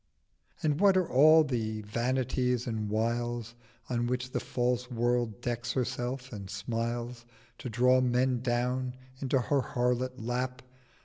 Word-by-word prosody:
And 150 -1 +1
what 195 -1 +5
are 185 - +2
all 155 +4 +7
the 110 -6 -2
Vanities 125 +2 0
and 110 -3 -2
Wiles 115 +1 -1 0.3
In 120 -1 -1
which 125 +1 -2
the - - -1
false 125 0 -1
World 120 -2 0
decks 120 0 -2
herself 125 0 -3
and 100 -2 -7
smiles 115 +4 -3 0.4
To 125 - -5
draw 125 +3 +4
Men 125 0 +2
down 125 +1 -1 0.2
into 135 0 +1
her 140 +2 +1
harlot 125 -1 0
Lap? 125 +2 -3
125 Hz, 135 wpm, -30 LUFS, 120-130 Hz, 0.4 s, all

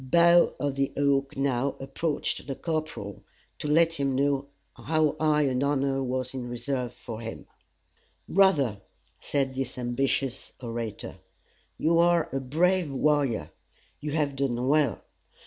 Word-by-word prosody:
Bough 170 +5 +5
of 140 -1 -1
the 135 0 +1
Oak 140 -1 +1
now 135 0 0
approached 145 +3 -2
the 135 - -3
corporal, 155 - -4 0.4
to - - -3
let 165 +2 +4
him 140 -4 -1
know 140 0 +1 0.3
how 155 -1 +1
high 150 -1 +3
an 130 -2 0
honor 140 -1 +1
was 130 0 -2
in 125 -2 -5
reserve 125 0 -3
for 115 -2 -8
him. 115 0 -7 0.8
"Brother," 145 - +3 0.4
said 135 -2 -1
this 130 -1 -4
ambitious 130 +1 -1
orator, 115 -3 -5 0.6
"you 165 +1 +3
are 170 -1 +4
a 135 - 0
brave 165 +5 +1
warrior. 140 -4 +1 0.5
You 150 -1 -4
have 145 -3 0
done 130 -2 -1
well. 150 +1 +2
140 Hz, 135 wpm, -27 LUFS, 130-150 Hz, 0.8 s, Bough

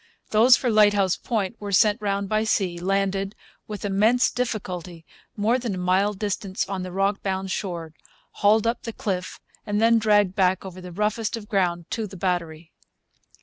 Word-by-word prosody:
Those 235 +4 +6
for 250 -3 -1
Lighthouse 205 -3 +4
Point 220 -1 -3
were 205 -1 -5
sent 205 +3 +3
round 200 -1 -1
by 215 +2 +1
sea, 185 -5 0
landed, 195 +2 -1 0.3
with 210 -1 -6
immense 215 +5 +3
difficulty, 185 -8 -4 0.3
more 225 +5 +2
than 235 -6 -3
a - - -6
mile 185 +3 +1
distant 195 -1 -3
on 195 -1 -3
the 185 0 -6
rock 195 +2 0
bound 190 -1 -3
shore, 170 -6 -4 0.5
hauled 210 +1 +4
up 230 +1 0
the 230 - -6
cliff, 185 -4 -4 0.2
and 205 0 -1
then 230 +1 +4
dragged 205 -3 +3
back 190 0 +1
over 185 -1 -9
the 180 0 -9
roughest 210 +4 -1
of 210 -2 -10
ground 180 -5 0
to 225 -3 -2
the 190 0 -11
battery. 170 -3 -3
200 Hz, 175 wpm, -24 LUFS, 185-215 Hz, 0.5 s, Those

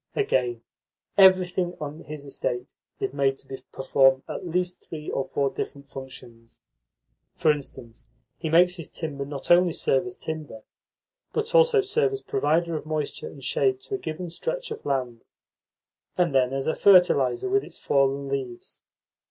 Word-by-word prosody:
Again, 125 - 0 0.5
everything 185 -2 +4
on 150 +2 -7
his 150 -1 -8
estate 125 -2 -4 0.3
is 200 - -2
made 135 -1 +1
to 135 -1 -9
perform 135 0 +3
at - - -5
least 180 +1 -1
three 155 -2 -6
or 135 - 0
four 140 -1 -1
different 140 0 -6
functions. 130 -4 -11 0.8
For 155 - +4
instance, 125 -6 -7 0.3
he 160 - -3
makes 180 +3 +5
his 165 - -6
timber 140 -4 -5
not 140 +1 -4
only 175 -1 +6
serve 135 +4 +1
as 180 - -7
timber, 155 -8 -6 0.7
but 450 +2 -2
also 480 -3 +6
serve 420 +2 +1
as 405 - -4
a - - -34
provider 170 - +1
of 155 - -4
moisture 155 - -3
and - - -11
shade 390 -1 +1
to 410 - -9
a 395 - -1
given 165 - -5
stretch - - -4
of 450 - -6
land, 125 -4 -2 0.9
and 175 -5 +2
then 130 -1 +3
as 135 0 -2
a 160 - +1
fertiliser 175 -10 +4
with 400 +1 +2
its - - -10
fallen 140 0 +1
leaves. 135 -3 -5
155 Hz, 160 wpm, -25 LUFS, 135-180 Hz, 0.9 s, only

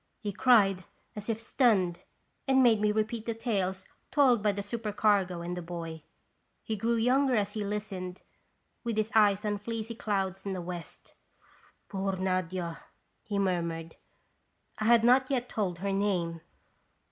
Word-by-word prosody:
he 205 -3 -4
cried, 200 -5 +4 0.3
as 210 +1 -7
if 225 -1 0
stunned, 200 -8 +2 0.5
and 265 -1 +5
made 225 -4 +5
me 210 0 +3
repeat 215 +1 -2
the 230 - -1
tales 190 -5 -2 0.2
told 260 -6 +4
by 210 0 +3
the 200 0 -4
super 215 +1 -4
cargo 195 -4 +2
and 175 +1 -4
the 180 - -4
boy. 165 -2 -6 0.6
He 220 - -2
grew 230 +3 0
younger 255 +3 +3
as 205 -1 0
he 215 - -2
listened, 200 -3 -5 0.6
with 230 -3 -2
his 215 0 0
eyes 210 -1 +4
on 205 -1 -1
fleecy 225 +1 -4
clouds 195 -4 -2
in 195 - -3
the 185 - -3
west. 175 -1 -8 0.4
" - - -31
Poor 195 -1 -2
Nadia! 185 -2 -2 0.2
" - - -45
he 205 -2 -2
murmured. 170 -4 -1 0.8
I 215 - -1
had 235 0 +5
not 255 +2 +5
yet 250 -3 0
told 190 -8 -2
her 200 +3 -2
name. 180 -5 0
205 Hz, 165 wpm, -29 LUFS, 185-225 Hz, 0.8 s, and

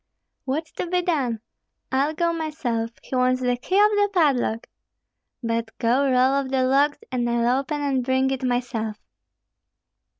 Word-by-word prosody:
What's 305 +4 -3
to - - -4
be 360 +1 0
done? 265 -11 -1 0.5
I'll 280 +4 +1
go 340 +1 +1
myself; 295 -8 -2
he - - -5
wants 255 0 +2
the 250 -1 +1
key 255 +10 -3
of 420 +1 +6
the 410 -1 +2
padlock! 275 - +1 0.8
But 230 -1 -2
go 245 +4 +2
roll 260 0 +3
off 265 - -6
the 260 -1 +1
logs, 280 +3 +3
and 240 -2 0
I'll 240 +2 +2
open 290 +2 -3
and 270 -3 0
bring 260 +1 +1
it 265 -1 -2
myself." 240 -4 -2
260 Hz, 160 wpm, -23 LUFS, 245-300 Hz, 0.8 s, of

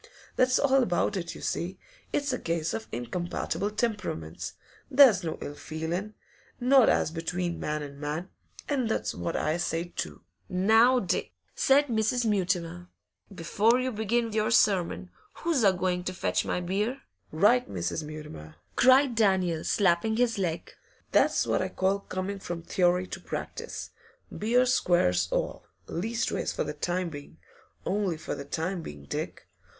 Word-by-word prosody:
That's 255 0 +4
all 270 -1 +4
about 210 -2 +1
it, 170 -3 -4
you - - -10
see; 180 +3 -2 0.3
it's 285 -2 0
a 255 - -2
case 165 -1 -1
of 225 - -4
incompatible 175 - -2
temperaments; 210 - -3 0.4
there's 255 -9 +7
no 160 -2 -3
ill 145 - -5
feelin', 170 +8 -4 0.4
not 255 -1 +5
as - - +2
between 170 +1 -3
man 150 0 -2
and 140 -1 -9
man, 155 +5 -4 0.4
And 260 -6 0
that's - - -1
what 85 0 -3
I 155 +2 0
say, 175 0 -2
too.' - - -5 0.3
'Now, 225 +7 +5
Dick,' 185 - -2 0.2
said 280 +2 +4
Mrs. 235 0 0
Mutimer, 180 -4 0 0.4
'before 205 +7 +2
you 255 0 -1
begin 225 +1 0
your 215 +1 +1
sermon, 180 - +2 0.2
who's 320 -7 0
a 195 - +7
going 180 -1 -1
to 185 - -2
fetch - - 0
my - - -1
beer?' 210 +9 -2 0.3
'Right, 210 +10 +3
Mrs. 90 - -2
Mutimer!' 150 - -9 0.2
cried 260 0 +5
Daniel, 190 -7 +2
slapping 195 +2 +2
his 235 -3 +1
leg. 170 -3 -2 0.4
'That's - - +3
what - - +1
I - - -1
call 190 +1 +1
coming 195 +1 -4
from 175 -3 -5
theory 180 +1 +2
to 185 - -7
practice. - - -6 0.4
Beer 245 +4 +3
squares 90 - +2
all - - -2 0.2
leastways 225 +7 -2
for - - -1
the 150 - -4
time 175 +4 -2
being 145 -2 -10 0.5
only 195 -4 0
for 155 - -5
the 140 - -6
time 170 +5 -2
being, 75 - -9
Dick. - - -5
185 Hz, 155 wpm, -28 LUFS, 165-225 Hz, 0.5 s, there's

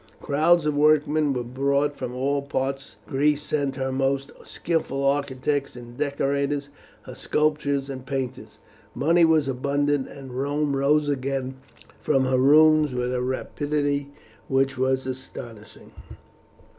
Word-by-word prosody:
Crowds 155 +3 +2
of 150 -1 0
workmen 150 0 +3
were 125 -2 -2
brought 140 +4 0
from 125 -2 -5
all 140 +2 0
parts. 135 -1 -3
Greece 145 +2 +1
sent 140 -3 -1
her 130 0 -2
most 135 +1 -1
skilful 150 -5 -2
architects 140 0 -1
and 120 -1 -11
decorators, 140 0 -1 0.3
her - - -10
sculptors 150 -2 0
and 130 -2 -7
painters. 130 -2 -5 0.4
Money 170 +4 +3
was 160 -3 +3
abundant, 140 +1 0
and 135 -2 -10
Rome 145 +1 0
rose 145 +2 +2
again 135 -1 -2 0.4
from 135 -3 +1
her 130 0 +2
ruins 150 0 +5
with 125 0 -1
a 125 - -1
rapidity 145 +2 -2 0.4
which 135 +1 +1
was 130 +1 0
astonishing. 120 -4 -9
140 Hz, 130 wpm, -24 LUFS, 130-145 Hz, 0.4 s, ruins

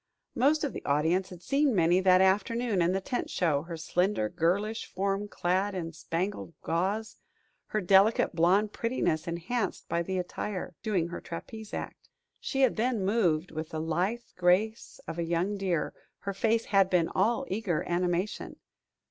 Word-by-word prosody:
Most 290 +6 +3
of 290 - -1
the - - -6
audience 160 +6 +1
had 180 -1 -11
seen 275 - +2
Minnie 175 0 +4
that 185 -1 +5
afternoon 205 +2 +2
in 170 +1 +3
the 190 - +1
tent 245 +6 -3
show, 155 -6 +1
her 170 +1 -7
slender 180 - 0
girlish 195 - 0
form 195 +2 -1
clad 190 +1 0
in 165 -2 -4
spangled 170 +2 -3
gauze, 195 +6 -1 0.5
her 215 - -1
delicate 195 +4 +4
blonde 185 +6 +3
prettiness 175 -9 -1
enhanced 175 +8 -2
by 170 - 0
the 185 +2 -2
attire, 180 +1 -4
doing 190 -6 0
her 170 - -6
trapeze 215 +6 -8
act. - - -7 0.3
She 270 - -2
had 260 -3 +3
then 230 -3 0
moved 185 -6 +1
with 155 0 -5
the 160 - -4
lithe 175 +9 -1
grace 185 +5 +1
of 165 - -5
a - - +1
young 170 +5 0
deer; 185 -6 -1 0.3
her 200 - -3
face 225 +3 +1
had 195 -2 +3
been 175 -3 +3
all 235 +8 +1
eager 190 -5 -1
animation. 175 +3 -1
190 Hz, 165 wpm, -29 LUFS, 170-215 Hz, 0.5 s, that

